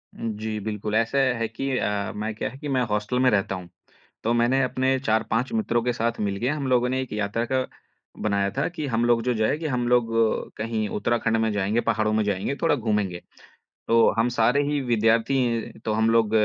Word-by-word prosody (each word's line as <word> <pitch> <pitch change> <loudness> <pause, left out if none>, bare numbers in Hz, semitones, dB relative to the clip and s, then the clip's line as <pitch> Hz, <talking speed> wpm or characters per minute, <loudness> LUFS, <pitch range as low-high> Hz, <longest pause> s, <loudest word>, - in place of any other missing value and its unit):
उ - - -15 0.2
जी। 110 -1 -3
बिल्कुल 105 0 -3
ऐसा 115 +5 +1 0.2
है 115 0 -1
कि 125 +5 -4
अ, 100 -1 -1
मैं 110 +1 -3
क्या - - -3
है 130 - -12
कि 150 +1 -7
मैं 130 -2 +1
हॉस्टल 105 +4 -1
में 130 0 +4
रहता 95 -2 +1
हूँ। 90 -1 -9 0.6
तो 115 - +2
मैंने 120 +3 +3
अपने 130 +1 +1
4-5 115 - 0
मित्रों 160 - 0
के 125 +1 0
साथ 115 0 -1
मिल 100 -1 -1
गया, 125 +8 0
हम 140 -2 -3
लोगों 125 -1 +3
ने 130 +1 0
एक 130 - -6
यात्रा 105 +2 -1
का 130 -1 +1 0.6
बनाया 100 -2 +1
था 135 - +1
कि 160 -4 -5
हम 115 -2 0
लोग 120 -1 +3
जो 125 0 0
जाएँगे 145 +9 0
हम 125 -3 -1
लोग 120 -2 +3 0.5
कहीं 110 -1 -2
उत्तराखंड 115 0 0
में 110 0 +1
जाएँगे, 105 +3 +1
पहाड़ों 110 -2 0
में 110 0 +2
जाएँगे, 100 +6 -1
थोड़ा 165 -3 +4
घूमेंगे। 105 -7 -1 0.7
तो 115 0 +5
हम 115 +2 +3
सारे 120 +4 +2
ही 145 0 0
विद्यार्थी 115 0 +1
तो 110 - 0
हम 110 +1 +2
लोग 115 -2 +3
115 Hz, 210 wpm, -24 LUFS, 110-125 Hz, 0.7 s, तो